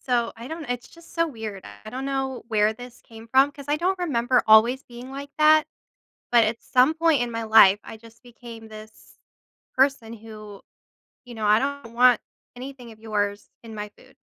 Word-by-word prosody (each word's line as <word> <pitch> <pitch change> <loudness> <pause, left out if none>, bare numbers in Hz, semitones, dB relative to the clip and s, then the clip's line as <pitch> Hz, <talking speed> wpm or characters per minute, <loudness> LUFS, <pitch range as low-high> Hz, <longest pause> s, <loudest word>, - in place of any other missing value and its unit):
So, 240 -3 -1
I 235 +2 -9
don't 320 -3 -7
it's 245 0 -4
just 335 0 -18
so 335 0 +1
weird, 220 -7 -8 0.2
I - - -9
don't 260 +2 -6
know 270 -2 -3
where 215 -1 +2
this 245 +2 -13
came 225 0 -14
from 270 +3 +3
'cause 280 -1 -12
I 295 - +1
don't 365 +4 -1
remember 255 -7 +1
always 230 +5 +5
being 245 +1 -12
like 280 +1 -8
that, 310 0 +5 0.6
but 235 -2 +5
at 220 +2 -3
some 255 +4 +3
point 325 -4 +2
in 240 - -3
my 230 0 -4
life 210 -3 +6
I - - -10
just 230 0 -18
became 235 -2 -12
this 215 0 -14 0.6
person 265 -4 +1
who 215 -2 -12 0.6
you 245 -1 -11
know, 220 -1 -4
I 210 +1 +4
don't 275 -3 -5
want 245 0 +4 0.3
anything 250 -1 -10
of 220 - -16
yours 205 -2 -3
in 225 -1 -10
my 210 0 -6
food. - - -21
240 Hz, 195 wpm, -24 LUFS, 220-270 Hz, 0.6 s, life